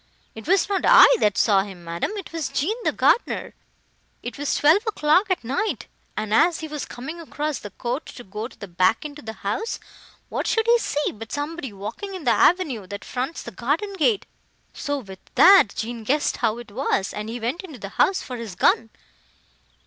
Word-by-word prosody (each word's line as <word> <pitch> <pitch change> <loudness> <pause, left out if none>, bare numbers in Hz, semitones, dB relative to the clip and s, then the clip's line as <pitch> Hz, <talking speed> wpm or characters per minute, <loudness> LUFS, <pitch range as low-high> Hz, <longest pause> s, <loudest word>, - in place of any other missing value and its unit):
"It 220 +5 -10
was 380 +1 +3
not 400 -2 0
I - - +9
that 205 - +2
saw 200 -3 +4
him, 190 -3 -9
madam, 170 0 -2
it 385 -4 -8
was 325 -4 -2
Jean 360 +11 0
the - - +2
gardener. 480 - +1 0.7
It 240 - -5
was 290 0 -1
twelve 315 +7 +5
o'clock 365 -1 +3
at 370 -8 0
night, 275 - -2 0.3
and, 215 0 -2
as 330 +9 +4
he 315 - -4
was 300 -2 -5
coming 310 +8 -7
across 300 -2 -3
the 205 - -8
court 245 - -4
to 245 - -10
go 210 +3 -5
the 200 - -11
back 185 +4 +2
way 300 - -4
into 290 +1 -12
the 220 0 -7
house, 430 - -2 0.5
what - - -3
should 450 -1 +2
he 475 0 +5
see—but 225 - -3
somebody 290 -2 -4
walking 215 - -6
in 365 - -7
the 245 - +3
avenue, 255 - +2
that 200 +2 -7
fronts 260 +6 -4
the - - -8
garden 310 - -1
gate! 390 +3 +1 0.5
So, 285 0 -2
with 195 -8 -9 0.2
that, 385 - +7
Jean 230 0 -4
guessed 285 +7 +1
how 225 -2 0
it 240 -3 -10
was, 200 -4 -1
and 210 +1 -5
he 240 +2 -5
went 240 +9 -2
into 315 -8 -9
the 200 -3 -7
house 375 - +2
for 250 - -6
his 225 -6 -7
gun." 225 +4 +3
265 Hz, 200 wpm, -23 LUFS, 215-330 Hz, 0.7 s, I